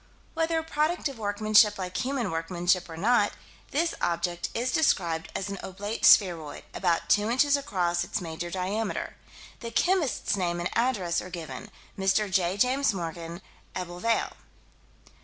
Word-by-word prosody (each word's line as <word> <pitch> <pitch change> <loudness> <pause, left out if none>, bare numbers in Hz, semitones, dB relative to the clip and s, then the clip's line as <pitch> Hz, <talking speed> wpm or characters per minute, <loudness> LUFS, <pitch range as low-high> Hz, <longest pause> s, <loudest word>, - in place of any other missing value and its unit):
Whether 325 0 0
a 320 - -1
product 315 +2 0
of 265 -4 -10
workmanship 210 0 +4
like 185 -1 -5
human 255 -5 -1
workmanship 175 +2 0
or 165 - -8
not, 210 +3 +3 0.4
this 330 +3 0
object 175 0 -1
is 245 +3 0
described 170 - +1
as 195 - -2
an 200 -1 -5
oblate 205 +4 -3
spheroid, 170 -7 +4
about 175 -3 0
two 210 +1 +3
inches 280 +4 +4
across 175 -10 0
its 180 - -3
major 170 0 -5
diameter. 195 +4 -2 0.4
The 230 - -6
chemist's 345 - +1
name 175 -3 -1
and 175 - -2
address 210 -8 +1
are 180 - -8
given: 175 +4 -7 0.3
Mr. 195 +1 +2
J. 185 0 +1
James 250 0 +2
Morgan: 170 0 -6 0.3
Ebbw 180 -1 -5
Vale. 230 0 0
195 Hz, 150 wpm, -27 LUFS, 175-235 Hz, 0.4 s, workmanship